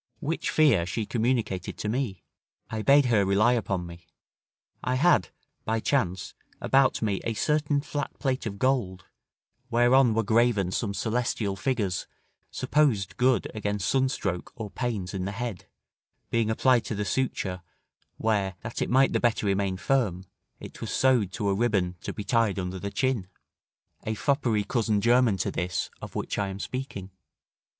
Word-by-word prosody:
Which 160 Hz, +3 st, -2 dB
fear 120 Hz, -, +4 dB
she 110 Hz, +3 st, -2 dB
communicated 115 Hz, -6 st, -1 dB
to -, -, -4 dB
me. 110 Hz, -6 st, -2 dB, 0.5 s
I 110 Hz, -1 st, -2 dB
bade 140 Hz, +4 st, +5 dB
her 115 Hz, -5 st, +3 dB
rely 100 Hz, +5 st, +3 dB
upon 100 Hz, -6 st, -1 dB
me: 85 Hz, 0 st, -11 dB, 0.8 s
I 125 Hz, -, 0 dB
had, 135 Hz, -, +3 dB, 0.3 s
by 110 Hz, 0 st, 0 dB
chance, 95 Hz, -8 st, -1 dB, 0.3 s
about 135 Hz, -3 st, +2 dB
me 100 Hz, -3 st, 0 dB
a 115 Hz, -, -2 dB
certain 145 Hz, +3 st, +1 dB
flat 145 Hz, 0 st, -4 dB
plate 130 Hz, -3 st, -1 dB
of 100 Hz, -2 st, -5 dB
gold, 100 Hz, -7 st, 0 dB, 0.6 s
whereon 120 Hz, 0 st, +4 dB
were 115 Hz, -, +2 dB
graven 110 Hz, -4 st, +2 dB
some 100 Hz, +1 st, -2 dB
celestial 110 Hz, -3 st, -1 dB
figures, 100 Hz, -6 st, -1 dB, 0.4 s
supposed 110 Hz, -11 st, +1 dB
good 125 Hz, -3 st, +2 dB
against 105 Hz, -2 st, -2 dB
sunstroke 130 Hz, -9 st, 0 dB
or 110 Hz, -4 st, -6 dB
pains 110 Hz, -7 st, -3 dB
in 95 Hz, -2 st, -3 dB
the 100 Hz, -, -3 dB
head, 110 Hz, -4 st, -5 dB, 0.7 s
being 115 Hz, -2 st, +1 dB
applied 120 Hz, +2 st, +3 dB
to 110 Hz, -, -3 dB
the 105 Hz, 0 st, -2 dB
suture: 95 Hz, -5 st, -2 dB, 0.6 s
where, 100 Hz, -4 st, 0 dB
that 110 Hz, +1 st, -5 dB
it -, -, 0 dB
might 135 Hz, +2 st, +4 dB
the -, -, +2 dB
better 115 Hz, -3 st, +1 dB
remain 100 Hz, -1 st, 0 dB
firm, 100 Hz, -6 st, 0 dB, 0.3 s
it -, -, -11 dB
was -, -, -4 dB
sewed 125 Hz, -8 st, +3 dB
to 105 Hz, -, -2 dB
a 100 Hz, -, +2 dB
ribbon 95 Hz, -5 st, +1 dB
to -, -, -4 dB
be 105 Hz, -, -6 dB
tied 115 Hz, -3 st, +1 dB
under 95 Hz, 0 st, -3 dB
the 100 Hz, -, -4 dB
chin; 125 Hz, -4 st, -1 dB, 0.8 s
a 110 Hz, -, 0 dB
foppery 115 Hz, 0 st, +1 dB
cousin 110 Hz, -2 st, 0 dB
german 120 Hz, -2 st, +3 dB
to -, -, -1 dB
this 90 Hz, 0 st, -2 dB
of -, -, -9 dB
which -, -, -3 dB
I 100 Hz, -, 0 dB
am 95 Hz, 0 st, -6 dB
speaking. 100 Hz, -5 st, -5 dB
110 Hz, 160 wpm, -27 LUFS, 95-125 Hz, 0.8 s, bade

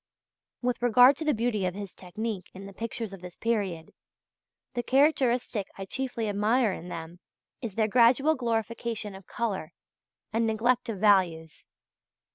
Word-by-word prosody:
With 245 Hz, -1 st, 0 dB
regard 245 Hz, +3 st, +7 dB
to -, -, -4 dB
the 300 Hz, -, +3 dB
beauty 220 Hz, -3 st, 0 dB
of 180 Hz, -, -4 dB
his 200 Hz, -2 st, -7 dB
technique 200 Hz, +1 st, -5 dB
in 195 Hz, +1 st, -9 dB
the 200 Hz, -, -10 dB
pictures 225 Hz, -1 st, -4 dB
of 195 Hz, -, -10 dB
this 180 Hz, -1 st, -9 dB
period, 195 Hz, -8 st, -2 dB, 0.8 s
the 240 Hz, -, -1 dB
characteristic 255 Hz, -5 st, +2 dB
I 195 Hz, -, -5 dB
chiefly 245 Hz, 0 st, -3 dB
admire 210 Hz, +2 st, +2 dB
in 175 Hz, -, -8 dB
them 170 Hz, +1 st, -7 dB, 0.4 s
is 225 Hz, -6 st, -5 dB
their 220 Hz, -1 st, +2 dB
gradual 250 Hz, +7 st, +5 dB
glorification 230 Hz, -4 st, -2 dB
of 190 Hz, -1 st, -12 dB
colour, 205 Hz, -9 st, -3 dB, 0.6 s
and 225 Hz, 0 st, +2 dB
neglect 235 Hz, +3 st, +1 dB
of 220 Hz, -, -3 dB
values. 180 Hz, -6 st, +2 dB
220 Hz, 150 wpm, -28 LUFS, 195-240 Hz, 0.8 s, regard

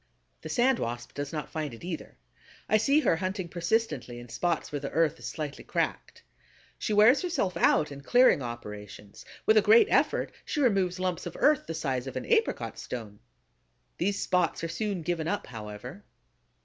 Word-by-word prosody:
The -, -, -7 dB
Sand 255 Hz, 0 st, +3 dB
Wasp 120 Hz, +1 st, -4 dB
does 145 Hz, 0 st, -4 dB
not 150 Hz, -2 st, -5 dB
find 150 Hz, -6 st, -4 dB
it 115 Hz, -, -15 dB
either. 170 Hz, -, -6 dB, 0.5 s
I 215 Hz, -, +4 dB
see 275 Hz, +8 st, +3 dB
her 165 Hz, -, +2 dB
hunting 185 Hz, +1 st, -3 dB
persistently 170 Hz, -, -1 dB
in 120 Hz, 0 st, -10 dB
spots 165 Hz, +7 st, -1 dB
where 145 Hz, -, -2 dB
the 140 Hz, -, -4 dB
earth 160 Hz, -2 st, +1 dB
is -, -, -6 dB
slightly 150 Hz, -3 st, -5 dB
cracked. -, -, -3 dB, 0.6 s
She -, -, -2 dB
wears 215 Hz, +6 st, +6 dB
herself 335 Hz, -, -1 dB
out 155 Hz, -3 st, +3 dB
in 140 Hz, 0 st, -8 dB
clearing 245 Hz, -, +5 dB
operations; 105 Hz, -4 st, -8 dB, 0.2 s
with 220 Hz, -, +5 dB
a -, -, +7 dB
great 220 Hz, +3 st, +7 dB
effort -, -, +2 dB
she 300 Hz, -, -3 dB
removes 195 Hz, -8 st, +2 dB
lumps 185 Hz, -2 st, -2 dB
of 175 Hz, -, -8 dB
earth 295 Hz, 0 st, +3 dB
the 165 Hz, -, -4 dB
size 135 Hz, -5 st, -2 dB
of 135 Hz, -, -6 dB
an -, -, -3 dB
apricot 455 Hz, 0 st, 0 dB
stone. 110 Hz, -4 st, -7 dB, 0.8 s
These 200 Hz, +3 st, 0 dB
spots 180 Hz, -2 st, 0 dB
are -, -, 0 dB
soon 200 Hz, -2 st, -2 dB
given 165 Hz, -1 st, -1 dB
up, 205 Hz, +3 st, -1 dB
however. 115 Hz, -, -8 dB
170 Hz, 180 wpm, -28 LUFS, 135-210 Hz, 0.8 s, a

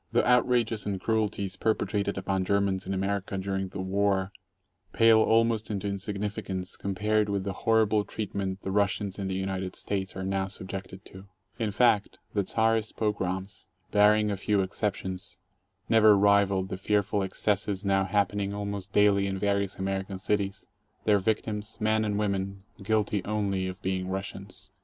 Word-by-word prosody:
The -, -, +3 dB
outrages 120 Hz, -3 st, +2 dB
and 100 Hz, -2 st, -2 dB
cruelties 105 Hz, -2 st, -1 dB
perpetrated 100 Hz, -1 st, 0 dB
upon 95 Hz, 0 st, -1 dB
Germans 100 Hz, -1 st, 0 dB
in 95 Hz, -, -1 dB
America 95 Hz, 0 st, -2 dB
during 95 Hz, 0 st, -2 dB
the 95 Hz, +1 st, -6 dB
war 95 Hz, 0 st, +1 dB, 0.6 s
pale 115 Hz, -1 st, +6 dB
almost 115 Hz, 0 st, +2 dB
into 100 Hz, -1 st, -2 dB
insignificance 100 Hz, -1 st, -3 dB
compared 105 Hz, +2 st, 0 dB
with 100 Hz, -1 st, -1 dB
the 100 Hz, 0 st, -3 dB
horrible 110 Hz, 0 st, +2 dB
treat 105 Hz, 0 st, -5 dB
ment 95 Hz, -1 st, -3 dB
the 95 Hz, -, -3 dB
Russians 100 Hz, 0 st, 0 dB
in 100 Hz, -, -2 dB
the 95 Hz, -, -2 dB
United 95 Hz, -1 st, -3 dB
States 95 Hz, -2 st, -3 dB
are 95 Hz, -, -4 dB
now 95 Hz, 0 st, -1 dB
subjected 95 Hz, 0 st, -7 dB
to. 95 Hz, +1 st, -12 dB, 0.3 s
In 110 Hz, -2 st, 0 dB
fact, 105 Hz, -1 st, +2 dB, 0.2 s
the 100 Hz, -, +1 dB
Czarist 110 Hz, +2 st, +1 dB
pogroms, 95 Hz, -3 st, -2 dB, 0.2 s
barring 105 Hz, 0 st, +4 dB
a 100 Hz, -, -2 dB
few 100 Hz, +1 st, +1 dB
exceptions, 95 Hz, -1 st, -3 dB, 0.5 s
never 110 Hz, -2 st, +6 dB
rivaled 100 Hz, -1 st, +3 dB
the -, -, -4 dB
fearful 100 Hz, +1 st, +1 dB
excesses 100 Hz, +1 st, -1 dB
now 95 Hz, 0 st, +3 dB
happening 100 Hz, 0 st, 0 dB
almost 100 Hz, -1 st, -4 dB
daily 100 Hz, -1 st, +4 dB
in 95 Hz, 0 st, -2 dB
various 100 Hz, -1 st, 0 dB
Amer 95 Hz, 0 st, -1 dB
ican 95 Hz, 0 st, -7 dB
cities, 100 Hz, -1 st, -1 dB, 0.4 s
their 105 Hz, -2 st, +4 dB
victims, 105 Hz, +1 st, -2 dB
men 110 Hz, 0 st, +2 dB
and 105 Hz, -1 st, -1 dB
women, 100 Hz, -1 st, -2 dB, 0.2 s
guilty 105 Hz, -1 st, 0 dB
only 100 Hz, -3 st, -1 dB
of 95 Hz, 0 st, -6 dB
being 95 Hz, 0 st, -1 dB
Russians. 95 Hz, 0 st, -6 dB
100 Hz, 155 wpm, -28 LUFS, 95-105 Hz, 0.6 s, pale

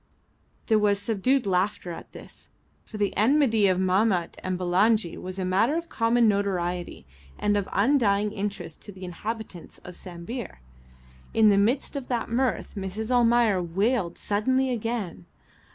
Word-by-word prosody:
There 220 Hz, -2 st, +3 dB
was 205 Hz, -1 st, +2 dB
subdued 225 Hz, +5 st, 0 dB
laughter 185 Hz, -1 st, 0 dB
at 165 Hz, -, -9 dB
this, -, -, -13 dB, 0.3 s
for 215 Hz, -, -10 dB
the 205 Hz, -1 st, -1 dB
enmity 225 Hz, -2 st, +3 dB
of 185 Hz, -1 st, +2 dB
Mahmat 185 Hz, -1 st, +1 dB
and 185 Hz, -1 st, -2 dB
Bulangi 185 Hz, +2 st, +2 dB
was 185 Hz, +1 st, -7 dB
a 190 Hz, -, -2 dB
matter 200 Hz, +10 st, +2 dB
of 335 Hz, 0 st, -5 dB
common 230 Hz, 0 st, +2 dB
notoriety 180 Hz, -, -1 dB, 0.3 s
and 205 Hz, 0 st, +1 dB
of 200 Hz, -2 st, -1 dB
undying 210 Hz, -3 st, +2 dB
interest 195 Hz, -6 st, -5 dB
to 205 Hz, -, -9 dB
the 185 Hz, -1 st, -9 dB
inhabitants 205 Hz, 0 st, -7 dB
of 180 Hz, -, -10 dB
Sambir. 185 Hz, +6 st, -7 dB, 0.8 s
In 220 Hz, -1 st, +6 dB
the 200 Hz, -, +4 dB
midst 240 Hz, +9 st, +1 dB
of 275 Hz, -3 st, -5 dB
that 235 Hz, -3 st, -2 dB
mirth 250 Hz, 0 st, -1 dB
Mrs. 205 Hz, +4 st, -4 dB
Almayer 235 Hz, -5 st, +3 dB
wailed 185 Hz, +2 st, 0 dB
suddenly 260 Hz, +6 st, 0 dB
again. 225 Hz, -, -4 dB
205 Hz, 150 wpm, -26 LUFS, 185-230 Hz, 0.8 s, In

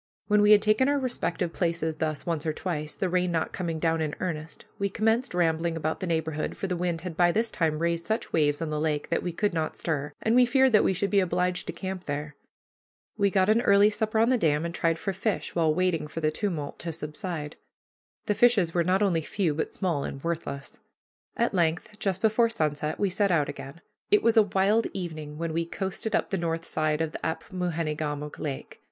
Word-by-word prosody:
When 210 Hz, -1 st, +3 dB
we 210 Hz, -, +5 dB
had 210 Hz, -1 st, +7 dB
taken 215 Hz, +6 st, +3 dB
our 285 Hz, -, +2 dB
respective 245 Hz, -10 st, -2 dB
places 165 Hz, -2 st, -1 dB
thus 155 Hz, -2 st, -2 dB
once 165 Hz, -2 st, -2 dB
or 155 Hz, -, +1 dB
twice, 155 Hz, -3 st, -4 dB
the 190 Hz, -, -1 dB
rain 180 Hz, 0 st, +1 dB
not 165 Hz, -1 st, -1 dB
coming 170 Hz, -3 st, -2 dB
down 165 Hz, 0 st, +1 dB
in 150 Hz, -2 st, -2 dB
earnest, 160 Hz, -3 st, -5 dB
we 200 Hz, 0 st, 0 dB
commenced 225 Hz, +2 st, +1 dB
rambling 165 Hz, -1 st, +1 dB
about 160 Hz, 0 st, -2 dB
the 185 Hz, -, -3 dB
neighborhood, 160 Hz, -2 st, -2 dB
for -, -, -3 dB
the 185 Hz, -2 st, -1 dB
wind 175 Hz, -2 st, -1 dB
had 180 Hz, -3 st, -6 dB
by 175 Hz, +1 st, +4 dB
this 225 Hz, +4 st, 0 dB
time 160 Hz, -3 st, 0 dB
raised 170 Hz, +1 st, -1 dB
such 220 Hz, +1 st, -2 dB
waves 150 Hz, 0 st, +2 dB
on 155 Hz, -, -3 dB
the 150 Hz, -, -1 dB
lake 150 Hz, -1 st, -1 dB
that 170 Hz, -, +1 dB
we 180 Hz, -, -3 dB
could 205 Hz, +3 st, 0 dB
not 160 Hz, -2 st, -2 dB
stir, 145 Hz, -3 st, -2 dB
and 220 Hz, -, +1 dB
we 250 Hz, +1 st, +7 dB
feared 265 Hz, +1 st, +4 dB
that 210 Hz, -, +5 dB
we -, -, +3 dB
should 195 Hz, +2 st, -1 dB
be 200 Hz, -, +4 dB
obliged 180 Hz, 0 st, 0 dB
to -, -, -3 dB
camp 190 Hz, -1 st, -5 dB
there. 150 Hz, +1 st, -4 dB, 0.8 s
We 200 Hz, -2 st, +2 dB
got 190 Hz, -1 st, +2 dB
an 220 Hz, +2 st, +4 dB
early 200 Hz, -1 st, +5 dB
supper 220 Hz, +1 st, -1 dB
on 225 Hz, +2 st, +4 dB
the 255 Hz, -2 st, +3 dB
dam 155 Hz, -3 st, +2 dB
and 170 Hz, -, -4 dB
tried 165 Hz, -1 st, +1 dB
for 195 Hz, +3 st, -3 dB
fish, 205 Hz, +3 st, -2 dB
while 165 Hz, -2 st, +2 dB
waiting 170 Hz, -2 st, 0 dB
for 160 Hz, -, -6 dB
the 155 Hz, -1 st, +1 dB
tumult 155 Hz, -5 st, -3 dB
to 170 Hz, -, -4 dB
subside. 155 Hz, 0 st, -5 dB, 0.7 s
The 210 Hz, -, +1 dB
fishes 205 Hz, -7 st, +4 dB
were 175 Hz, -, +2 dB
not 185 Hz, +4 st, +2 dB
only 175 Hz, -5 st, +2 dB
few, 170 Hz, 0 st, -1 dB
but 155 Hz, -, -2 dB
small 170 Hz, -8 st, -1 dB
and 135 Hz, -, -6 dB
worthless. 165 Hz, -4 st, -4 dB, 0.6 s
At 235 Hz, -1 st, +1 dB
length, 175 Hz, +4 st, 0 dB
just 195 Hz, -2 st, -2 dB
before 225 Hz, +1 st, +4 dB
sunset, 155 Hz, -6 st, -1 dB
we 200 Hz, -2 st, +1 dB
set 200 Hz, +2 st, +2 dB
out 150 Hz, -5 st, +2 dB
again. 145 Hz, +3 st, -8 dB, 0.3 s
It 415 Hz, 0 st, +4 dB
was 230 Hz, 0 st, +4 dB
a 225 Hz, -, +8 dB
wild 205 Hz, +3 st, +2 dB
evening 155 Hz, -5 st, -6 dB
when 165 Hz, 0 st, -3 dB
we 165 Hz, +1 st, +1 dB
coasted 190 Hz, +5 st, -3 dB
up -, -, 0 dB
the 195 Hz, -, +1 dB
north 165 Hz, -1 st, -2 dB
side 155 Hz, 0 st, 0 dB
of 160 Hz, -1 st, -1 dB
this -, -, -7 dB
Apmoojenegamook 160 Hz, -4 st, -3 dB
Lake. 140 Hz, -3 st, -5 dB
170 Hz, 220 wpm, -27 LUFS, 155-200 Hz, 0.8 s, a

